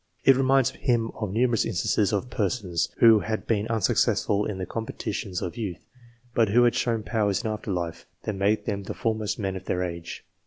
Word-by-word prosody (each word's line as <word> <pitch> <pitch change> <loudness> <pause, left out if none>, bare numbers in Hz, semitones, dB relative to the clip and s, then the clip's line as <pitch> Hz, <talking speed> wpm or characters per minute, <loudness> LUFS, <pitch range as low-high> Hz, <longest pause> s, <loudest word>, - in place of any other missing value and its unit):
It 135 - +7
reminds 135 -1 +3
him 115 -2 0
of 105 -4 -4
numerous 115 +1 +2
instances 105 0 +1
of 115 +4 -2
persons 95 -6 -1
who 115 -2 +8
had 110 +1 -3
been 105 -1 0
unsuccessful 105 -2 +1
in 105 - -4
the 95 - -3
competitions 100 -4 -4
of 90 - -5
youth, 100 -7 -5 0.5
but 115 -3 +3
who 120 +4 +5
had 120 - +4
shown 115 -3 0
powers 105 -2 0
in 110 - -1
after 105 -1 -4
life 85 -3 -4 0.2
that 110 - -2
made 100 +2 +1
them 100 -1 -2
the 100 - -6
foremost 110 -2 -1
men 95 -3 -2
of 95 0 -7
their 90 0 -1
age. 85 -2 -6
105 Hz, 195 wpm, -26 LUFS, 95-115 Hz, 0.5 s, who